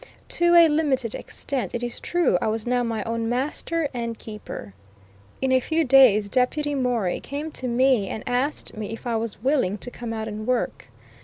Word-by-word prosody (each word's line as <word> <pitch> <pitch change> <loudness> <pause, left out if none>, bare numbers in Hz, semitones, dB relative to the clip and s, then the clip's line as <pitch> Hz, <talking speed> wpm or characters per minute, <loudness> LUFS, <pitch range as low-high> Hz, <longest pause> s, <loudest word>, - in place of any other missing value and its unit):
To 345 0 +3
a 340 -1 +9
limited 280 -7 +1
extent, 255 -9 -4
it 240 - -3
is 240 -1 -3
true, 345 - +1
I - - 0
was 220 0 -1
now 245 0 +1
my 225 -3 -2
own 230 0 -2
master 295 +5 -1
and 235 -2 -3
keeper. 210 - -8 0.7
In 265 - +2
a 260 - +5
few 320 +5 0
days 250 -7 +6
Deputy 270 +6 0
Morey 245 -9 0
came 295 +3 -5
to 260 - -2
me 245 -4 +2
and 220 - -5
asked 255 +4 -1
me 215 -1 -4
if 225 - -9
I 235 -1 -1
was 225 -1 -4
"willing" 255 -8 +1
to 245 - -7
come 240 -2 -6
out 220 -1 -3
and 215 0 -6
work. 255 -1 -1
245 Hz, 190 wpm, -24 LUFS, 225-275 Hz, 0.7 s, a